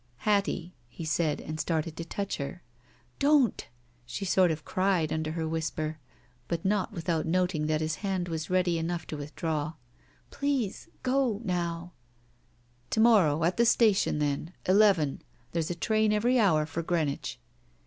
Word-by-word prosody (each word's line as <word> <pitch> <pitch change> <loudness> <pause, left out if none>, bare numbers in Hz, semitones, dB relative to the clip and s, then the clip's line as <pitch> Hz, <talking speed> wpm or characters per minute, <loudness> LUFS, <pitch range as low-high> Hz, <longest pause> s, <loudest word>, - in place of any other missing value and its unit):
'^ - - -37
"Hattie 200 - 0
— - - -36
" - - -36
he 165 - -4
said, 155 -1 0
and 155 +1 -6
started 160 0 -1
to 165 - -5
touch 200 +4 -3
her. 140 +5 -6 0.6
"Don't!" 280 -4 +3 0.4
she 120 +12 -5
sort 185 -1 +4
of 155 -1 -3
cried 185 -5 +1
under 155 0 -2
her 160 -1 -2
whisper, 160 -1 -3 0.5
but 170 0 -3
not 200 -1 +1
without 170 -4 -1
noting 175 -3 +1
that 155 0 +1
his 155 0 -1
hand 190 -3 -2
was 160 -2 -4
ready 180 -2 +2
enough 170 0 -3
to - - -6
withdraw. 150 +1 -3 0.6
"Please 275 -8 -2
— - - -35
go 260 -6 +2
— - - -11
now 175 -1 -2 0.3
— 120 0 -37
" 120 +1 -37
"To - - 0
morrow 190 -10 +5
at 170 +2 +1
the 235 - +4
station, 215 -8 +3
then. 150 +3 -1
Eleven. 190 -7 +4 0.3
There's 165 0 -1
a 175 - -2
train 215 +4 +2
every 240 +4 +3
hour 160 -8 +4
for 160 +2 -4
Greenwich." 160 - -2
170 Hz, 175 wpm, -29 LUFS, 155-195 Hz, 0.6 s, morrow